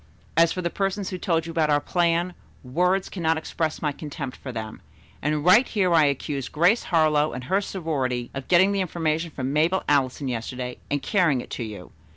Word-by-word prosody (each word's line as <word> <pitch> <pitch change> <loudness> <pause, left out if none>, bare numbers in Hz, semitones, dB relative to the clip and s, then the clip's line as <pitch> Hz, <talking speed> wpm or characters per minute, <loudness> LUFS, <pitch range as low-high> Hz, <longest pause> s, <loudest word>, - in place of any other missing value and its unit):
As 165 0 +5
for 185 - -3
the 170 - -1
persons 195 0 -2
who 185 - -4
told 165 -2 0
you 165 - -5
about 160 -2 +1
our 145 0 +4
plan, 175 +2 +1 0.3
words 180 +9 +1
cannot 165 -3 0
express 160 0 -3
my 150 - +1
contempt 140 -3 -6
for 130 - -8
them, 110 -2 -6 0.4
and 150 +1 -1
right 215 +8 +6
here 190 -5 +1
I 160 -2 +6
accuse 140 -1 -2
Grace 175 +9 +3
Harlowe 155 -4 +2
and 125 +1 -6
her 190 +10 +1
sorority 135 -11 -2
of 135 -1 -6
getting 185 +2 +5
the 200 -1 0
information 165 -2 -1
from 135 -2 -4
Mabel 165 +5 +2
Allison 140 -1 +1
yesterday 125 +1 -4
and 145 0 -1
carrying 175 - +2
it - - -9
to - - -3
you. 105 -5 -8
160 Hz, 195 wpm, -24 LUFS, 135-180 Hz, 0.4 s, right